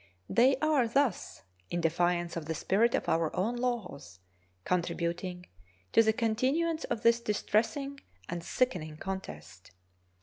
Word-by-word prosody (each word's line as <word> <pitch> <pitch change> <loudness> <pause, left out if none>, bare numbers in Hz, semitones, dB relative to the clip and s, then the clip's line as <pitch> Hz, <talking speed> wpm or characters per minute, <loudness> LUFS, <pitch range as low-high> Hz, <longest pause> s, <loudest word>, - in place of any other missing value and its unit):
They 260 +3 +5
are 300 -6 +3
thus, 255 -3 0 0.3
in 175 - -1
defiance 175 +1 +1
of 165 -2 -4
the 160 - -2
spirit 225 +9 +2
of - - -2
our 165 -1 +2
own 215 +7 0
laws, 230 - -4 0.5
contributing 180 0 -2 0.5
to - - +6
the 220 -1 +4
continuance 260 +9 0
of 225 - -3
this 230 0 +5
distressing 235 +6 -1 0.3
and 170 -1 -4
sickening 175 -9 -1
contest. 90 - -7
210 Hz, 130 wpm, -30 LUFS, 170-245 Hz, 0.5 s, to